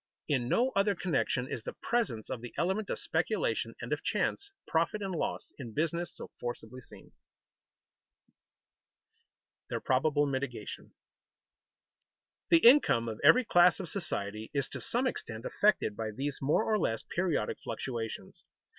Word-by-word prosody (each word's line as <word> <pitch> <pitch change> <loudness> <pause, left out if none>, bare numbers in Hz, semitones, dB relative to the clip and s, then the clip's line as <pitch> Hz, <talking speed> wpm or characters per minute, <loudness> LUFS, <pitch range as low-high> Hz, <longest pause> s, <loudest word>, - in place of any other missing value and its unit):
In 130 -5 0
no 255 - +3
other 200 0 +3
connection 155 -8 0
is 120 - -4
the - - -6
presence 215 - -1
of 125 -3 -4
the 120 - -9
element 190 +4 0
of - - -1
speculation - - -1
and - - -2
of - - -3
chance 400 - -1 0.2
profit 165 +6 +1
and 195 -2 -3
loss 165 - -3
in 120 -5 -8
business 170 +3 -1
so - - -10
forcibly 120 +1 -6
seen. - - -15 1.1
[Sidenote: - - -49
Their - - -2
probable 145 +3 +2
mitigation] 140 0 -4 1.5
The 330 -8 +7
income 235 - +6
of 110 -1 -5
every 255 0 +7
class 175 -2 +5
of 180 -4 -3
society 110 - -3
is 140 -2 +1
to - - -6
some 245 +3 0
extent 110 - -4
affected 200 - +2
by 110 0 -3
these 135 +6 -3
more 145 +10 +2
or 215 -1 +1
less 115 - -1
periodic 170 -11 -1
fluctuations. 115 -4 -5
145 Hz, 145 wpm, -31 LUFS, 120-195 Hz, 1.5 s, The